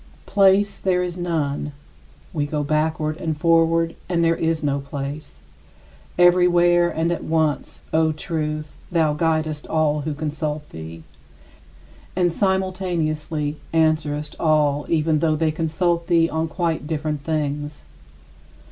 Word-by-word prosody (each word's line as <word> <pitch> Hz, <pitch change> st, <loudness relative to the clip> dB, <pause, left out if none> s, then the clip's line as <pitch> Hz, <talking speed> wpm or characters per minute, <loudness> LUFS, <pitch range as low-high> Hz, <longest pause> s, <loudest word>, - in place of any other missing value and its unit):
Place 200 Hz, 0 st, +3 dB
there 180 Hz, -1 st, +1 dB
is 175 Hz, -1 st, -4 dB
none. 150 Hz, -5 st, -2 dB, 0.6 s
We 145 Hz, -2 st, -1 dB
go 150 Hz, 0 st, -2 dB
"backward" 155 Hz, +1 st, 0 dB
and 160 Hz, -3 st, -3 dB
"forward" 165 Hz, +1 st, +3 dB
and 170 Hz, -2 st, +1 dB
there 165 Hz, 0 st, +3 dB
is 165 Hz, -1 st, -1 dB
no 140 Hz, -1 st, +1 dB
place. 140 Hz, -, -7 dB, 0.7 s
Everywhere 175 Hz, -1 st, +5 dB
and 165 Hz, +1 st, -1 dB
at 170 Hz, -, -2 dB
once, 160 Hz, -2 st, -1 dB
O 160 Hz, 0 st, +3 dB
Truth, 155 Hz, -1 st, -4 dB
thou 160 Hz, -3 st, +2 dB
guidest 155 Hz, -1 st, -1 dB
all 150 Hz, -2 st, +1 dB
who 150 Hz, 0 st, -3 dB
consult 150 Hz, 0 st, -3 dB
thee, 80 Hz, 0 st, -9 dB, 1.1 s
and 175 Hz, -1 st, +2 dB
simultaneously 170 Hz, -6 st, -1 dB, 0.2 s
answerest 155 Hz, -2 st, +1 dB
all 150 Hz, -2 st, +2 dB
even 155 Hz, -1 st, +2 dB
though 155 Hz, 0 st, +2 dB
they 160 Hz, 0 st, +1 dB
consult 170 Hz, +2 st, 0 dB
thee 165 Hz, -1 st, +4 dB
on 160 Hz, 0 st, -1 dB
quite 165 Hz, -3 st, -2 dB
different 150 Hz, -2 st, -2 dB
things. 150 Hz, -1 st, -3 dB
155 Hz, 125 wpm, -22 LUFS, 150-170 Hz, 1.1 s, Everywhere